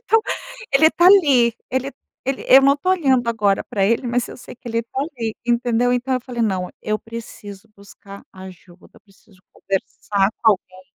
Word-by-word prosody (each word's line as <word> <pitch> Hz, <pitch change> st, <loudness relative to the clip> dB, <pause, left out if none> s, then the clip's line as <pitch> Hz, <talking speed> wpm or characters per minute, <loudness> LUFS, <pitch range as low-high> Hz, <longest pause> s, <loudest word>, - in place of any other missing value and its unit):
então 450 Hz, -2 st, +3 dB, 0.5 s
ele 315 Hz, +4 st, +5 dB
tá 345 Hz, -, +3 dB
ali, 280 Hz, -, +5 dB, 0.2 s
ele 260 Hz, +1 st, -2 dB, 0.4 s
ele 270 Hz, 0 st, -3 dB
eu 265 Hz, -, +8 dB
não 275 Hz, +1 st, +4 dB
tô 330 Hz, +6 st, -1 dB
olhando 270 Hz, -9 st, +2 dB
agora 205 Hz, -4 st, +1 dB
pra 205 Hz, -5 st, -1 dB
ele, 230 Hz, +5 st, +1 dB
mas 240 Hz, 0 st, -1 dB
eu -, -, -10 dB
sei -, -, -12 dB
que 245 Hz, 0 st, -11 dB
ele 230 Hz, 0 st, -1 dB
tá 235 Hz, +3 st, -6 dB
ali, 245 Hz, -7 st, -4 dB
entendeu? 240 Hz, 0 st, +1 dB
Então 250 Hz, +2 st, -1 dB
eu 255 Hz, -, -1 dB
falei: 245 Hz, -2 st, -4 dB
"Não, 190 Hz, -4 st, -1 dB
eu 215 Hz, 0 st, -1 dB
preciso 225 Hz, -3 st, -10 dB
buscar 200 Hz, 0 st, -14 dB
ajuda. 185 Hz, -1 st, -14 dB
Eu -, -, -19 dB
preciso 195 Hz, -1 st, -25 dB
conversar 195 Hz, 0 st, -2 dB
com 225 Hz, -, +6 dB
alguém". 185 Hz, -1 st, -9 dB
235 Hz, 185 wpm, -20 LUFS, 200-260 Hz, 0.5 s, eu